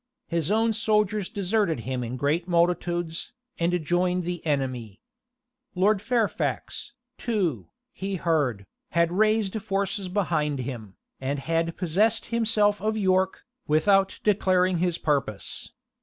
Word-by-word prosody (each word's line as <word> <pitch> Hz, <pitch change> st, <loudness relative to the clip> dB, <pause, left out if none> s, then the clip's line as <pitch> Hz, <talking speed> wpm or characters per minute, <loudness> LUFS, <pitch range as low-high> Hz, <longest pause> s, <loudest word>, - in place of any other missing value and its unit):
His 170 Hz, -2 st, -1 dB
own 225 Hz, +2 st, +2 dB
soldiers 210 Hz, -2 st, +1 dB
deserted 200 Hz, -, 0 dB
him 130 Hz, +1 st, -3 dB
in 120 Hz, +2 st, -4 dB
great 150 Hz, +6 st, 0 dB
multitudes, 175 Hz, -1 st, 0 dB, 0.3 s
and 170 Hz, -1 st, 0 dB
joined 180 Hz, +2 st, +1 dB
the 175 Hz, 0 st, -4 dB
enemy. 130 Hz, -8 st, -2 dB, 0.8 s
Lord 195 Hz, +2 st, +3 dB
Fairfax, 240 Hz, +3 st, -1 dB, 0.3 s
too, 170 Hz, -, -1 dB, 0.2 s
he 195 Hz, 0 st, -3 dB
heard, 145 Hz, -, 0 dB, 0.3 s
had 170 Hz, 0 st, +4 dB
raised 215 Hz, +1 st, +2 dB
forces 195 Hz, -1 st, -1 dB
behind 160 Hz, -7 st, 0 dB
him, 115 Hz, -7 st, -7 dB, 0.2 s
and 135 Hz, +2 st, -2 dB
had 165 Hz, +3 st, -1 dB
possessed 210 Hz, +6 st, +2 dB
himself 215 Hz, -3 st, +2 dB
of 215 Hz, +1 st, 0 dB
York, 190 Hz, -2 st, +1 dB, 0.2 s
without 195 Hz, +6 st, +3 dB
declaring 185 Hz, -3 st, +3 dB
his 175 Hz, -1 st, +1 dB
purpose. 140 Hz, -9 st, -2 dB
180 Hz, 120 wpm, -26 LUFS, 155-205 Hz, 0.8 s, had